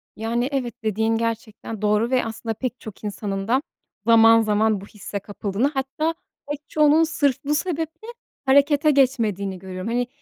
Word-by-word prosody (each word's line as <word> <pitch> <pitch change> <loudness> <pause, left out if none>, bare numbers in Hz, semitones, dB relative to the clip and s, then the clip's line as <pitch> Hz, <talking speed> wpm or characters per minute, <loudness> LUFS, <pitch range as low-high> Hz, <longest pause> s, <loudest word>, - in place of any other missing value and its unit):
Yani, 235 +4 -1
evet, 255 -4 -2
dediğin 220 +1 +1
gerçekten 225 -1 -4
doğru 210 +3 +2
ve 255 - +2
aslında 225 0 -4
pek 250 +2 -4
çok 215 -1 -11
insanın 200 -1 -4
da 260 +4 +3 0.4
zaman 230 0 +7
zaman 215 -1 +1
bu - - -9
hisse 205 -1 -7
kapıldığını, 205 +4 -2
hatta 270 +4 -1 0.4
pek 295 0 -7
çoğunun 305 +1 +4
sırf 285 -3 0
bu 295 +1 0
sebeple 325 +4 -3 0.4
harekete 285 +2 +4
geçmediğini 220 -9 +1
görüyorum. 185 +1 -6
Hani, 245 +1 0
230 Hz, 155 wpm, -23 LUFS, 210-280 Hz, 0.4 s, zaman